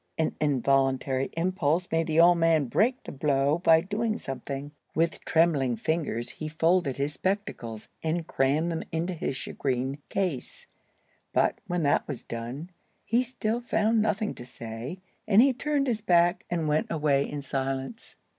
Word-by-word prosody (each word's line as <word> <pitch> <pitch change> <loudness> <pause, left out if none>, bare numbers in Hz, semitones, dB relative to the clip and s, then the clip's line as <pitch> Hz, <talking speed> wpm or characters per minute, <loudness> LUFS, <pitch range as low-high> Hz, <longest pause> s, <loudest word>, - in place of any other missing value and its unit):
An 160 - 0
involuntary 135 -1 +1
impulse 175 -1 +1
made 165 0 +1
the 160 0 +2
old 170 0 +6
man 165 -3 +3
break 240 - +1
the - - -7
blow 140 +2 +1
by 165 -2 +5
doing 215 +4 -1
something. 135 - -6 0.2
With 165 +1 0
trembling 150 -7 +3
fingers 120 -2 -2
he 155 - -6
folded 165 -2 +1
his 140 +2 -1
spectacles, 135 - -3
and 165 +1 -1
crammed 150 +6 +1
them 165 - -2
into 170 +3 -1
the 160 - -2
shagreen 130 0 -2
case. 180 -10 -2 0.7
But, - - +2
when 175 -1 -1
that 145 - +2
was 140 -5 -5
done, 120 +9 -6 0.3
he 235 +3 +2
still 240 -2 -2
found 220 -1 +2
nothing 215 0 0
to - - -10
say, 120 +5 -7 0.3
and 205 -1 +5
he 265 +2 +6
turned 285 +2 0
his 230 -5 -1
back 175 -1 +3
and 165 -3 -1
went 150 +1 +1
away 145 -3 +1
in 145 -1 -5
silence. 135 - -3
160 Hz, 155 wpm, -27 LUFS, 135-185 Hz, 0.7 s, old